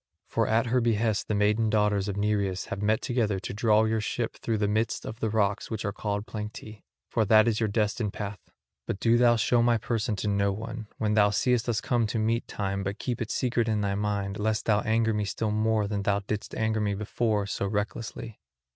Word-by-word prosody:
For - - 0
at 115 +3 +2
her 125 +1 +2
behest 110 -2 +1
the 105 - 0
maiden 105 +2 +2
daughters 105 -2 +2
of 100 -1 -3
Nereus 100 -2 0
have 100 - -5
met 110 +1 +1
together 110 -6 0
to - - -5
draw 110 0 +3
your 110 0 +1
ship 115 +2 -2
through 115 -2 -2
the 105 -1 +1
midst 110 +3 -1
of 110 - -7
the 110 - 0
rocks 105 -2 0
which 110 -2 -4
are 100 - 0
called 105 0 -3
Planctae, 105 0 -7 0.3
for 110 - +1
that 110 +2 +5
is 110 -2 +1
your 110 -2 +1
destined 105 0 0
path. 100 -2 -5 0.5
But 95 - -3
do 115 0 +3
thou 120 -1 +5
show 115 +1 +2
my 120 0 +3
person 110 0 -1
to 100 +2 -3
no 100 -1 +2
one, 110 +1 -6
when 105 -1 0
thou 105 -1 +5
seest 120 +3 +1
us 110 -2 0
come 120 -3 +1
to 105 - -2
meet 115 +2 0
time, 100 -1 -2
but 100 +1 -3
keep 120 0 -3
it 115 - -3
secret 120 -3 0
in 105 -1 +1
thy 100 -1 0
mind, 100 -1 -2
lest 110 +1 0
thou 105 -1 +3
anger 110 0 +1
me 105 0 0
still 105 +2 -2
more 110 0 +1
than 100 -1 -2
thou 100 0 +1
didst 105 +1 -4
anger 110 -1 0
me 100 -1 0
before 105 0 0
so 100 0 -2
recklessly." 110 +2 -4
110 Hz, 225 wpm, -27 LUFS, 105-115 Hz, 0.5 s, that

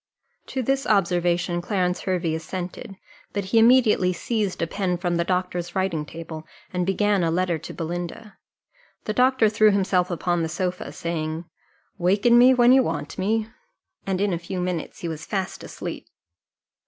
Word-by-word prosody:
To 260 - -3
this 270 +2 0
observation 175 -3 +1
Clarence 180 -1 0
Hervey 180 -4 -1
assented; 180 +4 -6 0.4
but 200 -1 -2
he 225 +4 +3
immediately 225 -6 +5
seized 205 +2 -2
a - - +2
pen 180 +1 -1
from 175 -1 -1
the 170 - +2
doctor's 180 -1 -2
writing 180 -6 -1
table, 160 -1 -8 0.3
and 180 0 -1
began 200 0 +2
a 165 - +2
letter 175 -1 0
to - - -8
Belinda. 175 +5 -5 0.7
The 215 - -1
doctor 255 -1 +4
threw 215 0 +4
himself 190 -3 +2
upon 175 0 0
the 160 - -1
sofa, 180 +2 -3
saying, 160 0 -4 0.5
"Waken 200 +7 +4
me 250 +1 +8
when 245 -1 +5
you 265 +1 +7
want 150 - -4
me," 215 +3 0 0.6
and 190 -1 0
in 200 -1 +1
a 170 - -2
few 180 +2 -5
minutes 180 -3 -3
he 170 - -3
was 160 -2 -5
fast 190 -2 -3
asleep. - - -7
180 Hz, 165 wpm, -24 LUFS, 175-210 Hz, 0.7 s, me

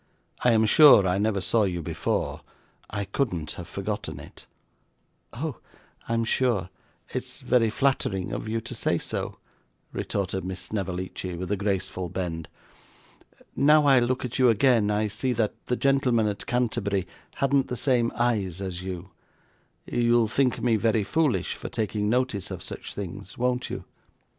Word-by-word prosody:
'I 125 - +5
am 110 0 +4
sure 110 -4 +8
I 90 +2 +1
never 105 -2 +1
saw 110 +3 +2
you 90 -3 -2
before; - - -2 0.5
I 100 0 -3
couldn't 90 - -2
have - - -8
forgotten - - -4
it.' - - -13 0.8
'Oh, 140 +2 -4 0.5
I'm 115 0 +1
sure 110 -7 +1 0.4
it's - - -5
very 120 -3 +3
flattering 110 -7 0
of - - -4
you 115 +1 -1
to 120 +2 -7
say 105 -6 +1
so,' - - -4 0.6
retorted 95 -1 -2
Miss 95 0 -4
Snevellicci 95 -1 -4
with 90 +2 -5
a - - +3
graceful 95 -2 -2
bend. 80 -3 -4 1.1
'Now 150 +1 +5
I 135 -3 +6
look 125 +2 0
at 125 +1 -4
you 130 -2 +6
again, 115 -2 +4
I 105 +1 +1
see 115 +5 -1
that 110 -3 0
the 125 - +1
gentleman 130 -4 +2
at 105 -1 -3
Canterbury 105 -6 0 0.3
hadn't 135 -1 +2
the 125 - -4
same 120 -3 +2
eyes 105 -7 0
as 95 -2 -4
you 95 0 -6 0.7
you'll 120 -1 +3
think 125 +2 +1
me 115 -2 +3
very 110 -1 +2
foolish 140 - +1
for - - -7
taking 105 -1 -1
notice 125 -5 0
of - - -6
such - - -7
things, 100 0 -7
won't 125 0 0
you? - - -5
110 Hz, 155 wpm, -26 LUFS, 95-125 Hz, 1.1 s, sure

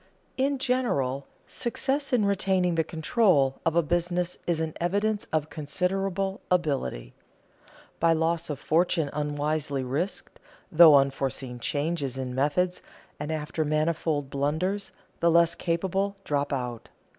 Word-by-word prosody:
In 275 +1 +1
general, 230 - 0 0.2
success 275 +4 -2
in 235 -5 +3
retaining 190 -2 +1
the 165 -1 +2
control 160 - +2
of 165 - +1
a 170 - +4
business 175 +2 -1
is 170 -2 +1
an 160 -1 -2
evidence 205 +4 0
of 155 -1 -1
considerable 190 +5 -2
ability. 140 - -1 0.9
By 165 0 +4
loss 165 +1 0
of 145 - -3
fortune 160 0 +1
unwisely 145 -1 -1
risked, 145 +10 -3 0.4
through 160 -2 +9
unforeseen 135 -2 0
changes 145 0 -2
in 130 -1 -4
methods, 150 +7 0 0.4
and 150 - -4
after 155 0 -2
manifold 155 -2 0
blunders, 160 +8 -1 0.3
the 170 - +3
less 170 0 +4
capable 190 +3 -1
drop 145 -3 -1
out. 125 -4 -4
160 Hz, 125 wpm, -27 LUFS, 145-180 Hz, 0.9 s, through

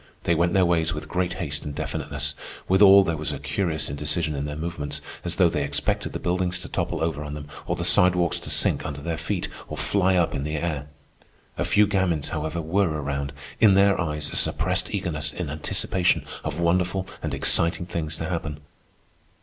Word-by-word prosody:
They 85 - +2
went 85 +1 +1
their 95 -2 +4
ways 85 -1 +1
with 75 +1 -6
great 90 +2 -1
haste 75 -6 -4
and 75 -1 -6
definiteness, - - -3 0.3
withal 100 +1 +7
there 85 -3 -1
was 75 - -3
a - - -4
curious 85 -7 -1
indecision 75 +3 -1
in 70 0 -3
their 75 0 -4
movements, 75 -3 -4 0.2
as - - -2
though - - +5
they - - -1
expected 70 0 -1
the - - -3
buildings 90 0 -1
to - - -8
topple - - -2
over 80 -3 -2
on 75 0 -6
them 75 -1 -8 0.2
or - - 0
the 85 - -3
sidewalks 90 -1 +5
to - - -6
sink - - +4
under 70 -1 -5
their 85 +2 -2
feet 85 +3 -3 0.2
or - - -6
fly 95 -2 +2
up 85 -2 +2
in 70 - -2
the 75 +1 -3
air. 75 -2 -3 0.7
A - - -1
few 105 0 +4
gamins, 95 -7 0
however, 80 +2 -3
were 95 +4 +1
around, 70 -2 -3 0.3
in 105 -4 +6
their 100 -1 +4
eyes 75 -2 -2
a - - -3
suppressed - - 0
eagerness 75 -3 -2
in 85 -4 -4
anticipation 85 +4 0 0.2
of 75 +1 -3
wonderful 90 +2 +1 0.2
and - - -3
exciting 85 +1 +2
things 80 -3 -4
to 80 - -4
happen. 80 -4 -4
85 Hz, 200 wpm, -24 LUFS, 75-90 Hz, 0.7 s, withal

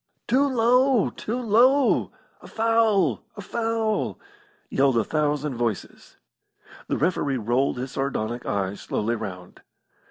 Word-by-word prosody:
"Too 275 +3 +3
low! 250 -1 +3
Too 235 +4 -4
low! 250 +4 +3 0.3
A - - -12
foul! 220 - +1
A - - -6
foul!" 225 +1 -2 0.5
yelled 135 -2 +2
a 115 - +3
thousand 150 +2 -1
voices. 115 -4 -4 0.7
The - - -1
referee 145 -4 0
rolled 120 +4 0
his 125 +1 -5
sardonic 120 -3 -3
eyes 100 0 -3
slowly 115 +3 -2
round. 90 -5 -8
150 Hz, 120 wpm, -24 LUFS, -, 0.7 s, Too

